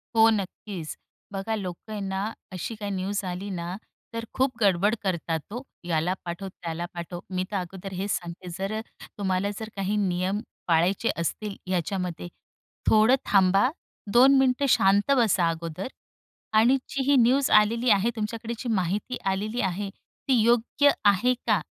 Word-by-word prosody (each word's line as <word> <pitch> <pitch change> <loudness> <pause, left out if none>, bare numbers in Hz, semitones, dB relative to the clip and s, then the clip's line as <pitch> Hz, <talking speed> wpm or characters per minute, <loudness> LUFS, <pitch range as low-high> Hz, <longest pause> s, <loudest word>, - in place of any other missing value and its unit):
हो 225 0 +7
नक्कीच. 195 -4 -3 0.4
बघा 195 +3 -2
लोकं 190 +1 -6
आहे 210 - -3
ना, 195 +3 -2 0.2
अशी 185 +5 -4
काही 205 -1 -5
न्यूज 195 +2 -2
आली 185 +3 -4
ना 175 0 -4 0.4
तर 230 0 -4
खूप 260 0 +2
गडबड 200 +2 +3
करतात 170 -3 -1
हो. 245 +3 -4 0.2
याला 170 +1 +1
पाठव, 175 +3 -5
त्याला 170 -2 -5
पाठव, 175 0 -6
मी 185 -1 -1
तर - - -3
अगोदर 190 +1 -6
हेच 195 +2 -2
सांगते 175 +1 -4
जर 200 +3 -2 0.4
तुम्हाला 190 0 0
जर 220 0 -6
काही 195 +1 -1
नियम 185 +3 0 0.3
पाळायचे 175 +7 +2
असतील 200 +4 -3 0.2
याच्यामध्ये. 180 -1 -2 0.6
थोडं 220 +4 +6
थांबा, 195 +4 +4 0.4
2 265 +4 +7
मिनिटं 265 +1 +3
शांत 200 +6 +4
बसा 190 -7 +3
अगोदर 165 +4 -4 0.7
आणि 245 +5 +5
जी 275 - -2
ही - - +6
न्यूज 260 +4 +3
आलेली 230 +3 0
आहे 205 +3 +4
तुमच्याकडे 225 +2 -3
जी 245 - -4
माहिती 200 +6 -1
आलेली 215 +5 -2
आहे 195 +1 -2
ती 255 +4 -2
योग्य 240 +5 +4 0.2
आहे 205 +6 +4
का - - +3
200 Hz, 150 wpm, -26 LUFS, 180-225 Hz, 0.7 s, हो